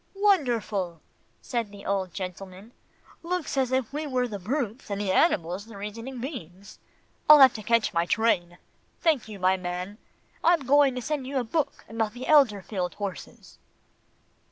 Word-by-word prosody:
"Wonderful," 235 - +1 0.4
said 235 -4 -2
the 200 -1 -12
old 190 -2 -1
gentleman, 190 +3 -8 0.5
"looks 350 -3 -3
as 260 -2 +1
if 260 -1 -1
we 300 +1 -3
were 255 -2 0
the 205 -4 -6
brutes, 240 +3 -3
and 200 -1 -3
the 200 -2 -1
animals 185 - +1
the 225 -3 -11
reasoning 230 +6 -7
beings 200 - -8 0.5
I'll 300 - +11
have 265 -3 +8
to 215 - -6
catch 230 +1 +1
my 170 0 +1
train 175 -6 +1 0.4
Thank 310 -9 +1
you, 210 - -7
my 185 0 +2
man. 180 +3 -5 0.4
I'm 335 -5 +3
going 280 0 +4
to 250 - -4
send 290 -2 -3
you 275 0 -3
a 255 - +1
book 295 +6 -2
about 225 -1 -2
the 245 +1 -7
Elberfeld 205 - +2
horses." 200 -4 -8
225 Hz, 160 wpm, -26 LUFS, 195-265 Hz, 0.5 s, I'll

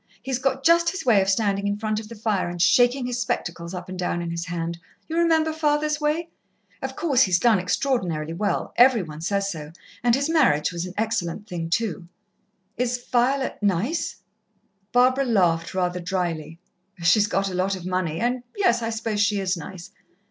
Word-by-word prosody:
He's 265 -2 -2
got 270 0 -1
just 335 +2 +5
his 380 -4 -5
way 220 -6 +5
of 190 - 0
standing 200 -1 +1
in 205 0 -1
front 215 0 -1
of 215 -1 -10
the 230 - -8
fire 205 -4 -1
and 175 0 -6
shaking 245 +7 +4
his 245 0 -2
spectacles 175 -7 -3
up 180 -1 -7
and 185 0 -7
down 175 -1 -1
in 170 -1 -4
his 170 +1 -4
hand 170 0 -3 0.3
you 325 - -4
remember 325 -2 +3
father's 300 -1 0
way? 315 +3 0 0.5
Of - - -4
course, 275 -7 +2
he's 185 -7 +4
done 225 -3 +4
extraordinarily 180 - -1
well 205 +4 -2
every 245 -4 +6
one 155 -2 -9
says 200 +3 0
so 155 -3 -7 0.3
and 240 0 +3
his 280 +2 0
marriage 265 - +3
was 175 +1 -4
an 180 - -10
excellent 215 -3 -2
thing, 170 -4 -4
too." 200 -2 -1 0.7
"Is 245 0 0
Violet 260 +2 +1
nice?" 205 - 0 0.8
Barbara 255 +2 +4
laughed 175 -8 +1
rather 180 -1 0
drily. 170 -3 -3 0.5
"She's 205 +5 +4
got 195 -1 0
a - - -6
lot 185 +2 0
of 180 -2 -9
money, 180 -3 -1
and 245 +3 0 0.2
yes, 240 -13 +3
I 225 - -2
suppose 220 -2 -2
she 205 0 +2
is 190 -1 0
nice. 170 +1 -9
205 Hz, 190 wpm, -24 LUFS, 175-250 Hz, 0.8 s, every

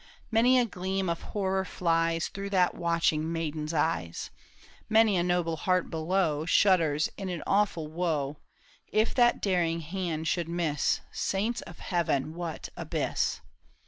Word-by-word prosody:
Many 240 +3 +5
a 245 - +4
gleam 190 -2 -2
of 170 - -2
horror 190 -2 -1
flies 165 -2 0
Through 200 0 -5
that 185 -3 +3
watching 165 -2 +1
maiden's 155 -2 -3
eyes; 150 - -1 0.6
Many 220 -2 +5
a 175 - +2
noble 175 -2 0
heart 185 0 0
below 160 -2 0
Shudders 165 -7 +4
in 195 -2 -4
an 175 -3 -4
awful 195 -5 +1
woe 155 -3 -1 0.3
— - - -31 0.2
If 215 +1 +1
that 240 -1 +3
daring 170 -4 +1
hand 165 -1 -3
should 170 0 0
miss, 165 -4 0
Saints 215 +5 -1
of - - -11
Heaven, 160 -5 -1
what 170 -1 -5
abyss - - -1
175 Hz, 145 wpm, -29 LUFS, 160-190 Hz, 0.6 s, Many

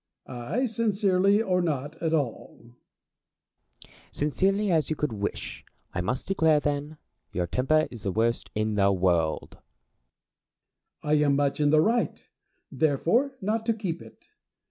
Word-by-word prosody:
Ay, 130 - -2
sincerely 205 -3 +2
or 180 -3 +1
not 150 -3 -2
at 165 -2 0
all. 145 -8 -2 1.3
Plato. - - -23 0.2
Sincerely 195 +7 +1
as 160 -3 +2
you 155 - 0
could 150 -5 -2
wish, 100 -1 -5 0.3
I 90 - -1
must 125 +8 -3
declare, 160 -5 +3
then, 145 +1 -3 0.3
your 90 0 -1
temper 135 - +1
is 120 - -9
the 95 - -2
worst 115 +4 0
in 110 0 0
the 100 -1 +3
world. 85 -5 0 1.4
Diogenes. 150 0 +2
I - - +2
am 140 - +3
much 140 0 0
in 145 -1 +3
the 155 +1 +5
right, 230 +7 0 0.5
therefore, 175 - +1
not 215 +3 -1
to 230 - +2
keep 185 -6 -4
it. - - -15
150 Hz, 145 wpm, -27 LUFS, 120-195 Hz, 1.4 s, the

